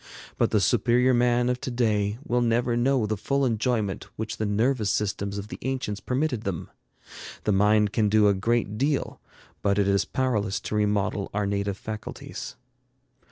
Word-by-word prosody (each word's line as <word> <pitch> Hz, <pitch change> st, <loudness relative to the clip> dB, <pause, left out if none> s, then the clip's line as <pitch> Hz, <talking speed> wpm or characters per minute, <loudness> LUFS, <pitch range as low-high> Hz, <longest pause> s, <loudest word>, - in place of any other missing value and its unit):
But -, -, +3 dB
the -, -, +2 dB
superior 125 Hz, +2 st, +3 dB
man 120 Hz, 0 st, +3 dB
of 125 Hz, 0 st, -1 dB
to 145 Hz, -, -3 dB
day 110 Hz, -4 st, 0 dB
will 120 Hz, 0 st, +1 dB
never 120 Hz, 0 st, +1 dB
know 125 Hz, 0 st, +2 dB
the 110 Hz, 0 st, -1 dB
full 140 Hz, +7 st, 0 dB
enjoyment 115 Hz, -4 st, -1 dB
which 110 Hz, 0 st, -4 dB
the 110 Hz, -, -1 dB
nervous 110 Hz, +1 st, +1 dB
systems 100 Hz, -1 st, -1 dB
of 100 Hz, +1 st, -6 dB
the -, -, -7 dB
ancients 125 Hz, -6 st, -3 dB
permitted 130 Hz, 0 st, -1 dB
them. 95 Hz, -6 st, -4 dB, 0.7 s
The 105 Hz, -, +1 dB
mind 105 Hz, +1 st, +3 dB
can 110 Hz, -3 st, +2 dB
do 105 Hz, 0 st, +5 dB
a 100 Hz, -, +4 dB
great 105 Hz, +1 st, 0 dB
deal, 140 Hz, +1 st, -1 dB, 0.4 s
but 100 Hz, -1 st, +1 dB
it 100 Hz, -1 st, +2 dB
is 100 Hz, -1 st, +2 dB
powerless 110 Hz, -7 st, -1 dB
to -, -, -5 dB
remodel 105 Hz, -1 st, 0 dB
our 105 Hz, 0 st, +1 dB
native 100 Hz, -1 st, -1 dB
faculties. 110 Hz, 0 st, -7 dB
110 Hz, 170 wpm, -26 LUFS, 100-125 Hz, 0.7 s, do